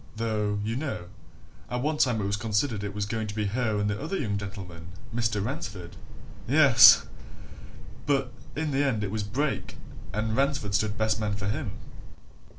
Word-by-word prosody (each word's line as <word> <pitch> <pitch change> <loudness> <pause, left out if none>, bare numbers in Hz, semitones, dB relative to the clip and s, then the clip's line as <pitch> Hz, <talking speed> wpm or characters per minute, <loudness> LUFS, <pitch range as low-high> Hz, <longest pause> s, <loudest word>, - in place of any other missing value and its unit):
Though, 105 -2 -1
you 110 +2 -2
know, 135 - -4 0.6
at 125 0 -2
one 150 +1 0
time 120 -7 +2
it - - -2
was 100 +1 0
considered 105 +1 -1
it 100 0 -5
was 105 -1 -1
going 110 +1 -3
to 105 - -6
be 105 -1 -1
her 110 +1 0
and 105 - +1
the 105 +3 -2
other 165 +6 -2
young 105 - -1
gentleman, 95 -5 -7 0.3
Mr. 115 -4 0
Ransford 105 - -5 0.5
yes! 130 -3 +8 1.0
But, 135 -4 +1 0.2
in 155 0 -1
the 140 +1 +2
end, 120 -7 0
it 100 - -3
was 110 0 -2
Brake 130 +8 -2 0.3
and 110 +2 -1
Ransford 135 -6 0
stood 105 0 +1
best 110 0 +1
man 105 -2 -1
for 100 -1 -4
him." 105 - -3
110 Hz, 175 wpm, -27 LUFS, 105-130 Hz, 1.0 s, yes